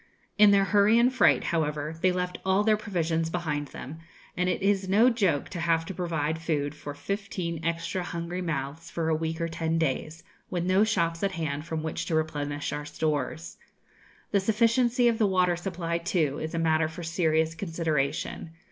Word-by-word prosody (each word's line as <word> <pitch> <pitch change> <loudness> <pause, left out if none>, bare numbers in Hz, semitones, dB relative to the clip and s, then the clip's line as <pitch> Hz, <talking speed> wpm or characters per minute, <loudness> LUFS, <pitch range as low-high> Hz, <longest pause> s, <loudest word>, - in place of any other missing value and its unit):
In 210 -1 +7
their 200 -1 +5
hurry 205 +3 +4
and 245 +2 +4
fright, 255 - +4
however, 150 -2 -1
they 185 - +4
left 180 0 -3
all 190 +2 +2
their 215 0 +4
provisions 165 -6 -1
behind 155 -4 -2
them, 145 +4 -9 0.4
and 180 +1 +1
it 185 - -1
is 195 -1 +1
no 225 +6 +5
joke 195 - +1
to 180 - -6
have 165 -1 +1
to 190 - -5
provide 160 -3 -2
food 150 -3 -1
for 145 -1 -8
fifteen 180 -1 -4
extra 170 +2 -2
hungry 175 +1 -4
mouths 160 -1 -4
for 165 -1 -2
a 160 - +2
week 160 +1 -3
or 165 - 0
ten 165 0 -1
days, 160 +1 -2 0.3
with 175 -1 -2
no 185 +3 +4
shops 170 -6 0
at 195 -1 0
hand 155 -2 -3
from 160 -1 -3
which 160 - -3
to 165 - 0
replenish 145 -2 -2
our 150 - -3
stores. 150 +1 -3 0.7
The 200 - +3
sufficiency 230 +4 +3
of 230 -1 +2
the 215 - +4
water 180 -2 +2
supply, 170 -1 -3
too, 165 -5 0
is 160 +1 -4
a - - -1
matter 160 -1 +2
for 160 +2 -8
serious 160 -1 +1
consideration. 165 -4 -2
165 Hz, 185 wpm, -27 LUFS, 160-190 Hz, 0.7 s, In